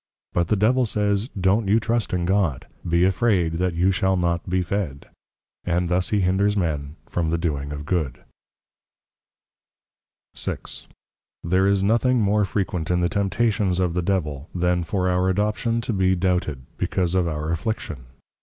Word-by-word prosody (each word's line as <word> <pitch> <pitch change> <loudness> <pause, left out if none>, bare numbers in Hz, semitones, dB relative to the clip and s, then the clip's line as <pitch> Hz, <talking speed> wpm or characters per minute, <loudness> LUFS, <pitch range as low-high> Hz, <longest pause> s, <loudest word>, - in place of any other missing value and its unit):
_ - - -43
But 85 -1 +1
the 110 - +2
Devil 120 +5 +3
says, 105 +2 0
don't 95 +3 +2
you 105 +3 +4
trust 115 0 -1
in 90 -1 0
God; 90 -8 +1 0.2
be 85 +1 +3
afraid 95 -4 +2
that 90 -1 0
you 90 +3 +3
shall 95 0 +1
not 85 0 -1
be 90 0 +1
fed; 85 -6 -3 0.6
and 90 0 0
thus 90 +1 +1
he 105 -2 +1
hinders 100 +3 +2
men 75 -5 -2
from 85 -2 -1
the 85 - +1
doing 75 -4 -2
of 75 0 -6
Good. 75 -8 -2 2.1
VI. - - -1 0.9
There 95 +3 +2
is 100 -1 +2
nothing 120 +4 +3
more 105 0 +2
Frequent 90 -4 -2
in 90 0 +2
the 85 - +2
Temptations 100 -2 +1
of 90 -2 +1
the 90 - 0
Devil, 80 -5 -2
then 90 0 +1
for 95 +2 -1
our 90 +1 +2
Adoption 105 +4 0
to 115 - -3
be 95 -1 +2
doubted, 90 -7 -1 0.2
because 90 -2 0
of 90 -2 +2
our 75 0 -2
Affliction. 85 - -3
90 Hz, 165 wpm, -23 LUFS, 85-100 Hz, 2.1 s, you